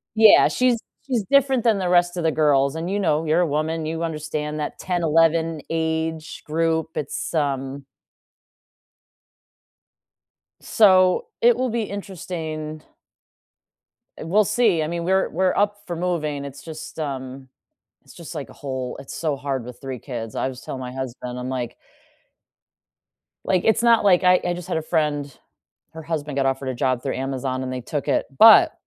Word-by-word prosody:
Yeah, 220 -1 +7
she's 250 -2 +2 0.3
she's 240 -6 0
different 270 -3 +4
than 220 -4 +3
the 180 -2 -1
rest 175 0 +3
of 170 - -2
the 160 - +2
girls 140 -2 +2
and 165 +3 -4
you 205 +1 -1
know, 160 -4 +1
you're 160 +3 +2
a - - +3
woman 155 +2 -1
you 165 +1 -3
understand 150 -1 -4
that 150 - -4
10, 175 -2 -2
11 165 0 +2
age 160 -1 -2
group. 160 +1 0
It's, 145 +3 -4
um 140 -3 -2 2.7
So, 185 -4 +4
it 240 0 +5
will 255 -1 -1
be 235 0 -1
interesting. 165 -6 -6 1.4
We'll 200 +7 +2
see. 205 -7 +2
I - - -1
mean, 170 0 -3
we're 190 +2 +2
we're 185 +2 +1
up 205 0 0
for 175 - -4
moving. 155 -5 -2
It's 140 0 -9
just, 160 0 -9
um 135 -3 -5 0.6
it's - - -17
just 170 0 -10
like 145 -4 -6
a - - -13
whole 130 -2 -5
it's 135 - -9
so 155 -3 -1
hard 135 -3 -3
with 125 0 -10
3 130 -2 -6
kids. 115 -4 -6
I - - 0
was 130 -1 -7
telling 130 - -6
my 125 0 -6
husband. 125 -1 -6
I'm, 125 +1 -5
like 125 -3 -4 1.7
Like, 185 -2 +1
it's 220 +1 +3
not, 235 -2 +4
like 185 -2 +4
I 180 0 +5
I 175 - 0
just 175 0 -8
had 180 - -1
a 160 - -1
friend, 150 -4 -1 0.6
her 160 0 -9
husband 150 -3 -4
got 135 -1 +1
offered 135 0 -1
a 130 - -2
job 130 -1 0
through 135 - -2
Amazon 130 -1 -3
and 130 0 -4
they 130 - -4
took 145 +4 -4
it, - - +1
but 225 0 +8
160 Hz, 175 wpm, -22 LUFS, 140-180 Hz, 2.7 s, but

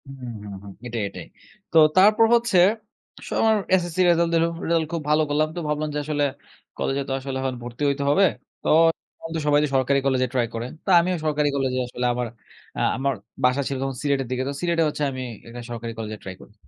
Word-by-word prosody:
হুম, 135 -3 -8
হুম, 100 -1 -8
হুম, 100 -1 -10
এটাই, 115 -2 -3
এটাই। - - -9 0.5
তো - - +3 0.2
তারপর 210 +4 +6
হচ্ছে 235 -5 +2 0.6
আসলে - - -4
আমার 220 -1 +4 0.2
এসএসসি 175 0 0
রেজাল্ট 170 0 +3
দিল, 165 - +4 0.2
রেজাল্ট 165 -1 +2
খুব 165 - -1
ভালো 150 +1 +4
করলাম। 150 +1 +2
তো - - -3
ভাবলাম 150 0 -1
যে - - 0
আসলে, 150 -1 0 0.5
"কলেজে 135 +1 -1
তো - - 0
আসলে 135 0 -4
এখন 130 -1 -2
ভর্তি 120 +4 -6
হইতে 140 0 -1
হবে। 195 +7 +5 0.4
তো - - -1 0.5
এখন 165 - -9 0.2
সবাই 145 0 +5
যে 150 - 0
সরকারি 135 +1 +3
কলেজে 130 -1 +2
ট্রাই 120 -2 +1
করে।" 115 +1 -3 0.2
তো - - -3
আমিও 180 +2 +1
সরকারি 150 -1 +1
কলেজে 130 -2 0
আসলে 125 0 -4
আমার 125 0 -2 0.5
আ - - 0 0.2
আমার 135 +1 0 0.3
বাসা 125 +2 +3
ছিল 140 - -2
তখন 135 -1 -2
সিলেটের 140 -3 0
দিকে। 130 0 -1
তো - - -3
সিলেটে 170 -1 +2
হচ্ছে 150 - -3
আমি 130 -1 -5 0.3
একটা 120 +1 -8
সরকারি 115 -1 -5
কলেজে 110 -1 -5
ট্রাই 95 -1 -7
করি। - - -16
140 Hz, 210 wpm, -24 LUFS, 125-160 Hz, 0.6 s, তারপর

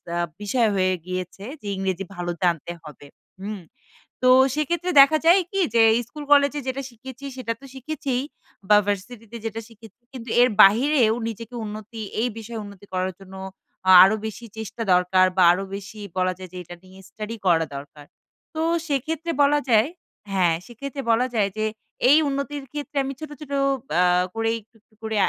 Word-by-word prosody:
একটা 170 - -7 0.3
বিষয় 230 +2 +2
হয়ে 185 -1 +2
গিয়েছে 185 +1 -5 0.2
যে - - -12
ইংরেজি 190 0 -2
ভালো 175 0 -4
জানতে 175 -1 0
হবে। 150 -2 -12 0.3
হুম? 205 +1 -5 0.6
তো 255 - +4 0.3
সেক্ষেত্রে 345 +4 -1
দেখা 295 +3 +6
যায় 350 +3 +6
কি? 390 - -1 0.2
যে 230 - +6 0.3
স্কুল 300 +3 -9
কলেজে 285 0 +5
যেটা 265 +1 -2
শিখেছি 260 +3 -11
সেটা 230 -3 -3
তো - - -12
শিখেছিই 265 -2 -3 0.5
বা 210 - +8
ভার্সিটিতে 225 +3 -4
যেটা 225 0 -4
শিখেছি 225 0 -17
কিন্তু 245 -2 -8
এর 250 - +5
বাহিরেও 230 +2 +4
নিজেকে 230 +2 -7
উন্নতি 215 +1 -7 0.2
এই 245 - +1
বিষয়ে 225 0 -6
উন্নতি 200 -1 -12
করার 185 0 -1
জন্য 190 0 -13 0.5
আ - - +9
আরো 195 +3 +4
বেশি 220 +2 -6
চেষ্টা 220 +1 -6
দরকার। 180 +1 +4
বা 185 - +6
আরো 185 +3 0
বেশি 200 +2 -9 0.2
বলা 185 0 +1
যায় 185 -1 -9
যে - - -7
এটা 175 +1 -10
নিয়ে 185 +1 -16
স্টাডি 215 +1 -6
করা 165 -3 +3
দরকার। 145 +1 -10 0.5
তো 315 - -1 0.3
সেক্ষেত্রে 315 +4 -2
বলা 290 +1 +4
যায় 220 +1 +5 0.4
হ্যাঁ 180 -4 +2
সেক্ষেত্রে 275 +4 -7
বলা 240 +3 +2
যায় 205 -3 +2
যে 215 - 0 0.4
এই 290 - +8
উন্নতির 280 +1 -3
ক্ষেত্রে 295 0 -6
আমি 270 +1 -4
ছোট, 310 - -7
ছোট 300 -2 -10 0.5
আ - - +5 0.3
করেই 225 0 0
একটু, 220 +3 -35
একটু 215 - -37
করে 220 0 -3
225 Hz, 175 wpm, -23 LUFS, 190-270 Hz, 0.6 s, আ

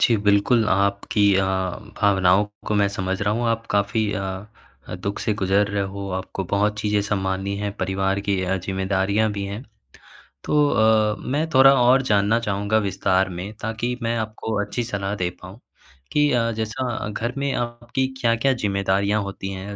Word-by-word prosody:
जी। 115 - +4
बिल्कुल 105 +3 +4
आपकी 100 +1 +2
अ, 95 - +3 0.6
भावनाओं 95 -1 +4 0.2
को 105 - 0
मैं 100 -1 +3
समझ 95 0 -3
रहा 105 +1 +1
हूँ। 120 +1 -1
आप 115 0 -1
काफ़ी 105 +1 +1
अ 95 - -3 0.7
अ, - - -5
दुःख 95 +3 -4
से 110 - 0
गुजर 100 +1 +2
रहे 100 -1 -1
हो। 100 0 -5
आपको 95 +1 -5
बहुत 105 +1 +1
चीज़ें 105 -1 +1
संभालनी 95 -1 -2
हैं। 105 0 -3
परिवार 95 +1 -1
की 100 -2 +1
अ, 95 +1 0
जिम्मेदारियाँ 95 +3 0
भी 100 -1 -4
हैं। 100 +5 -6 0.8
तो 150 -1 +3
अ, 110 -1 +3 0.2
मैं 155 +3 0
थोड़ा 135 +1 +8
और 130 +2 +5
जानना 105 +3 +3
चाहूँगा 105 -1 0
विस्तार 95 0 +1
में। 90 +4 -6
ताकि 115 +3 -2
मैं 115 0 -1
आपको 110 0 -4
अच्छी 110 +4 -3
सलाह 100 -3 -3
दे 90 -3 -1
पाऊँ 95 +5 -11 0.5
कि 150 0 +3
अ, 115 -2 +2
जैसा 110 +1 -3
घर 115 +4 -3
में 140 0 -1
आपकी 120 +2 -2
क्या-क्या 115 +3 +2
ज़िम्मेदारियाँ 100 -1 0
होती 95 0 -6
हैं 100 +2 -6
105 Hz, 170 wpm, -23 LUFS, 95-115 Hz, 0.8 s, थोड़ा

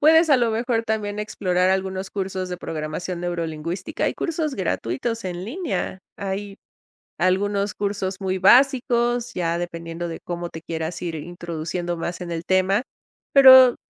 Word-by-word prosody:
Puedes, 320 +2 +6
a 280 - +7
lo 235 -2 +2
mejor, 230 +1 0
también, 210 -2 -2
explorar 185 -4 0
algunos 190 0 -1
cursos 190 -2 -3
de 180 - -4
programación 165 +3 -4
neurolingüística, 170 -1 -3
hay - - 0
cursos 315 -4 -2
gratuitos 190 - -2
en 180 0 -4
línea, 275 - -3 0.2
hay 200 0 -4 0.6
algunos 200 +2 +1
cursos 200 -2 -2
muy 190 -1 -1
básicos, 240 +1 +4
ya 170 -3 0
dependiendo 170 0 -5
de 165 - -6
cómo 175 0 -4
te 160 - -9
quieras 160 +1 -4
ir 170 -2 -3
introduciendo 170 +1 -4
más 170 +2 -4
en 175 -1 -5
el 165 0 -3
tema, 190 +4 +2 0.5
pero 260 -2 +9
190 Hz, 145 wpm, -23 LUFS, 175-225 Hz, 0.6 s, pero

